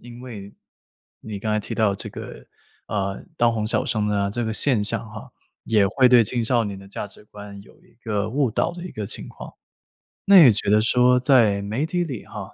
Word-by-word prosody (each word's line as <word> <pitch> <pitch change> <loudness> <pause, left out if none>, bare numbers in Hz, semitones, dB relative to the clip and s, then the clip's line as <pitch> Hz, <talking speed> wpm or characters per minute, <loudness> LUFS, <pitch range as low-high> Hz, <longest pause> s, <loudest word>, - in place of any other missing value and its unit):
因 120 0 -12
为 105 -6 -10 0.7
你 105 -2 -7
刚 110 +2 -3
才 105 - 0
提 - - -6
到 105 -3 +1
这 - - -7
个， - - -10 0.4
呃， 100 -1 -3
当 120 -1 +2
红 110 -2 -2
小 110 - 0
生 105 -2 -1
啊， 100 -1 0
这 120 +3 -3
个 110 - -2
现 115 -1 +3
象 115 +2 -1
哈， 110 0 -11 0.3
也 105 -3 +2
会 125 +5 +3
对 120 -2 +6
青 120 +1 -2
少 120 0 +1
年 100 -2 -6
的 95 0 -14
价 100 - -6
值 100 +1 -15
观 105 -1 -11
有 - - -21
一 - - -25
个 105 -2 -2
误 135 0 0
导 140 - -1
的 175 0 -9
一 180 - -7
个 105 -2 -6
情 - - -6
况。 - - -11 0.7
那 195 -3 +8
你 125 - +8
觉 100 -1 -1
得 105 +1 +4
说， 125 +2 +3
在 115 -7 +3
媒 110 +9 -2
体 175 +2 -1
里 135 -9 -7
哈， - - -9
110 Hz, 240 characters per minute, -22 LUFS, 105-125 Hz, 0.7 s, 那